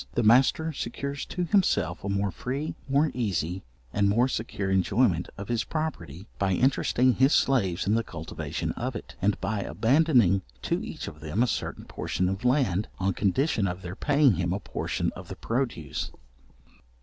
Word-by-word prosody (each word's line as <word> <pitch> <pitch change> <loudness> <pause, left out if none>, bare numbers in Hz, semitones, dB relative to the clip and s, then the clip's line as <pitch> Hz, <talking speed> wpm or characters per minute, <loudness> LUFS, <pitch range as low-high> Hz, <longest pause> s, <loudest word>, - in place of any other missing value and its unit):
The 120 - +2
master 135 +8 +4
secures 140 +2 -4
to 180 - -2
himself 170 - +1
a 100 - -3
more 100 0 0
free, 135 +9 -3 0.2
more 145 +3 +3
easy, 95 -6 -1 0.3
and 100 -1 +3
more 120 +5 +3
secure 110 -5 -3
enjoyment 95 0 +2
of 100 -1 -6
his 120 -2 0
property, 100 - -4
by 95 -1 +2
interesting 125 +2 +3
his 135 +4 +4
slaves 100 -11 +2
in 100 - +2
the 115 +1 +2
cultivation 80 -6 -4
of 125 +1 -4
it, 110 - -8
and 105 +1 +1
by 110 -2 -1
abandoning 120 - +3 0.2
to - - -1
each - - -6
of 75 - -8
them 80 +9 0
a - - +4
certain - - -3
portion 90 +1 -2
of 95 +4 -4
land, 125 -7 +2
on 95 0 0
condition 105 - +1
of 90 +1 -5
their 90 +1 -6
paying 140 - +3
him 90 0 0
a 100 - -2
portion - - -2
of - - -9
the - - -7
produce. 115 - -2
110 Hz, 175 wpm, -27 LUFS, 95-130 Hz, 0.3 s, master